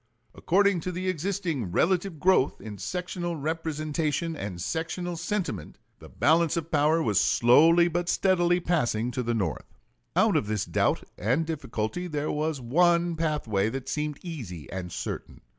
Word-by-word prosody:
According 200 Hz, 0 st, +2 dB
to 180 Hz, +3 st, -4 dB
the 185 Hz, +1 st, -4 dB
existing 170 Hz, -, -2 dB
relative 175 Hz, -, +1 dB
growth 180 Hz, -6 st, +3 dB
in 105 Hz, -3 st, -8 dB
sectional 180 Hz, -, -3 dB
representation 155 Hz, +1 st, -2 dB
and 100 Hz, -, -5 dB
sectional 170 Hz, -, -3 dB
sentiment, 185 Hz, +3 st, -3 dB, 0.2 s
the -, -, -13 dB
balance 165 Hz, +1 st, +2 dB
of 165 Hz, 0 st, -4 dB
power 155 Hz, +2 st, +3 dB
was 105 Hz, -3 st, +2 dB
slowly 165 Hz, +8 st, +5 dB
but 175 Hz, 0 st, -2 dB
steadily 175 Hz, -2 st, +3 dB
passing 125 Hz, -10 st, 0 dB
to 125 Hz, -, -2 dB
the 120 Hz, -1 st, -1 dB
North. 95 Hz, -10 st, -3 dB, 0.4 s
Out -, -, +4 dB
of -, -, +1 dB
this 105 Hz, -1 st, -1 dB
doubt -, -, +1 dB, 0.2 s
and 125 Hz, -, +1 dB
difficulty 155 Hz, +1 st, -3 dB
there 150 Hz, -2 st, -2 dB
was 150 Hz, -1 st, -1 dB
one 170 Hz, +6 st, +2 dB
pathway 145 Hz, -11 st, 0 dB
that 135 Hz, +2 st, -5 dB
seemed 150 Hz, -1 st, -2 dB
easy 105 Hz, -, -7 dB
and 90 Hz, -2 st, -5 dB
certain. -, -, -6 dB
160 Hz, 150 wpm, -27 LUFS, 125-175 Hz, 0.4 s, slowly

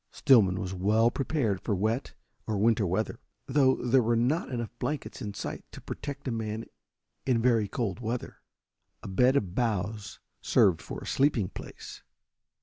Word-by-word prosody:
Stillman 105 Hz, -10 st, +4 dB
was 95 Hz, -2 st, -4 dB
well 110 Hz, +5 st, +3 dB
prepared 125 Hz, -, -1 dB
for 105 Hz, -, -1 dB
wet 110 Hz, +7 st, -1 dB, 0.3 s
or 110 Hz, -2 st, -1 dB
winter 110 Hz, -1 st, +3 dB
weather, 110 Hz, +6 st, -1 dB, 0.3 s
though 135 Hz, -1 st, +3 dB
there 125 Hz, +1 st, +3 dB
were 115 Hz, 0 st, +2 dB
not 130 Hz, +9 st, +1 dB
enough 120 Hz, -4 st, -3 dB
blankets 150 Hz, -1 st, -4 dB
in 105 Hz, -1 st, -5 dB
sight 100 Hz, -, -5 dB
to -, -, -10 dB
protect 140 Hz, -1 st, -7 dB
a -, -, 0 dB
man 110 Hz, -1 st, -3 dB, 0.6 s
in 125 Hz, -3 st, +3 dB
very 115 Hz, -3 st, +3 dB
cold 100 Hz, -1 st, -3 dB
weather. 120 Hz, +1 st, -4 dB, 0.6 s
A -, -, -6 dB
bed 125 Hz, +8 st, +3 dB
of 95 Hz, -10 st, 0 dB
boughs 105 Hz, -2 st, -2 dB, 0.2 s
served 90 Hz, -5 st, +3 dB
for -, -, -7 dB
a -, -, -8 dB
sleeping 135 Hz, -9 st, +2 dB
place. -, -, -10 dB
115 Hz, 160 wpm, -29 LUFS, 100-125 Hz, 0.6 s, Stillman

